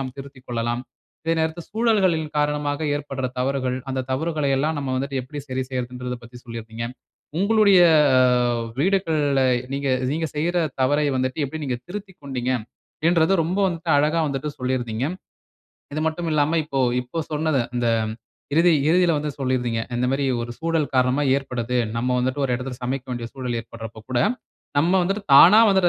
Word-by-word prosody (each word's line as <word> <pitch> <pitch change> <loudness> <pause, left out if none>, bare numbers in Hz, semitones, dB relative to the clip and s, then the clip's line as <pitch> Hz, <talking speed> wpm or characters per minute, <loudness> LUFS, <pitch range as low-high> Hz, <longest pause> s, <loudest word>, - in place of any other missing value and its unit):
நாம் 130 -1 -5
திருத்திக்கொள்ளலாம். 125 -3 -4 0.4
இதே 165 0 +1
நேரத்தில 160 +1 -2
சூழல்களின் 195 -9 +1
காரணமாக 145 0 0 0.2
ஏற்படுற 135 -3 -4
தவறுகள், 130 -1 0
அந்த 130 0 -1
தவறுகள 155 +1 -1
எல்லாம் 155 +3 0
நம்ம 135 -2 -3
வந்துட்டு 135 0 -2
எப்டி 145 +3 -7
சரி 130 0 -2
செய்றதுன்றதைப் 125 -1 -4
பத்தி 120 +1 -12
சொல்லியிருந்தீங்க. 115 0 -6 0.5
உங்களுடைய 200 0 +5 1.0
வீடுகள்ல 160 -7 +2 0.3
நீங்க, 140 0 -2 0.2
நீங்க 160 +1 -1
செய்ற 170 +4 0 0.2
தவறை 145 +3 +2
வந்துட்டு 130 +2 -1
எப்டி 155 +3 -6
நீங்க 130 -3 -1
திருத்திக்கொண்டீங்க, 175 -11 -5 0.6
என்றத 170 +1 +3
ரொம்ப 180 +4 -1
வந்துட்டு 165 -2 -3
அழகா 155 +3 +2
வந்துட்டு 140 +2 -3
சொல்லி 130 +1 0
இருந்தீங்க. 120 +1 -3 0.9
இது 155 - -1
மட்டும் 165 +2 -2
இல்லாம 155 +2 +2
இப்போ 140 -2 -3 0.2
இப்ப 145 +7 -4
சொன்னத, 155 -2 +1 0.2
இந்த 120 -1 0 0.7
இறுதி 170 +2 +5 0.2
இறுதியில 175 0 +4
வந்து 150 0 -2
சொல்லி 130 -1 0
இருந்தீங்க, 120 -2 -1
இந்த 125 +1 0
மாரி 140 +1 0 0.2
ஒரு 120 - -6
சூழல் 160 -4 -1
காரணமா 130 +3 +3
ஏற்படுது, 125 -3 -3 0.2
நம்ம 125 +2 0
வந்துட்டு 130 +3 -1
ஒரு 130 - -1
இடத்தில 125 0 -5
சமைக்க 130 +1 -2
வேண்டிய 120 -1 -4
சூழல் 125 -3 -3
ஏற்படுறப்போ 115 -1 -9
கூட 120 - +1 0.6
நம்ம 165 +5 +3
வந்துட்டு 195 +3 -1
தானா 180 +10 +9
வந்துட்டு 190 -2 +4
140 Hz, 155 wpm, -23 LUFS, 125-160 Hz, 1.0 s, தானா